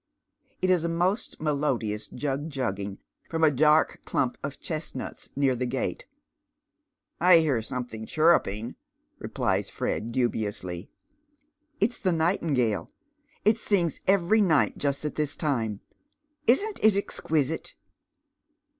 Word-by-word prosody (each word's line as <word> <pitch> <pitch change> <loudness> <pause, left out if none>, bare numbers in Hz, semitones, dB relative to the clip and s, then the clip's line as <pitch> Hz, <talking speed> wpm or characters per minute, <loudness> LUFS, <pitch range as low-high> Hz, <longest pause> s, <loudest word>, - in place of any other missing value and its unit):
It 185 - +4
is 180 -3 +3
a 170 - 0
most 180 +6 0
melodious 135 -8 -1
jug 145 +3 -3
jugging 100 -8 -3 0.3
fi 165 - -2
om 160 - 0
s 155 - +6
dark 150 +3 +3
clump 125 - 0
of 140 0 -5
chestnuts 155 -5 -5
near 135 -2 +2
the 125 +1 -2
gate. 130 +2 -3 0.6
" - - -55
I 170 - +10
hear 150 -7 +2
soniuLhiiig 110 -1 -5
chirping," 125 -9 +2 0.4
replies - - -1
Fred, 115 +2 -2
dubiously. 105 -7 -2 0.5
" 300 +1 -42
It's 235 +4 +1
the 185 -4 +1
nightingale. 160 - +1 0.6
It 215 +1 +4
sings 175 -8 0
every 195 +3 +4
night 165 -7 +3
just 140 +1 -1
at 150 - -2
this 150 -1 -2
tima. 115 - -1 0.7
Isn't 400 - +2
it 215 -2 +5
exquisite?" 160 -6 -1
150 Hz, 130 wpm, -27 LUFS, 125-170 Hz, 0.7 s, I